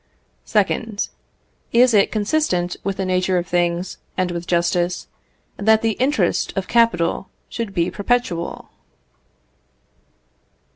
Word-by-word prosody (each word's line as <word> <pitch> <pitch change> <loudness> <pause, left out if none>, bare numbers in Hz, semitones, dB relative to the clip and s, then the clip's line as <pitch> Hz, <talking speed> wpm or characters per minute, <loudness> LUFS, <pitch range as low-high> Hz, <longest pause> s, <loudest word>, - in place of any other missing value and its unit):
2nd. 210 0 0 0.6
Is 245 +1 +5
it 200 -2 +4
consistent 205 - 0
with 195 0 -2
the 190 - -1
nature 185 0 +1
of 175 - -1
things, 175 +1 -1 0.2
and 185 -1 0
with 170 0 -5
justice, 175 +1 0 0.5
that 220 +2 +3
the 225 - +3
interest 235 -6 +1
of 190 - -1
capital 195 -6 +2 0.2
should 230 -4 -4
be 175 -3 0
perpetual? 205 -6 -2
190 Hz, 110 wpm, -21 LUFS, 175-220 Hz, 0.6 s, Is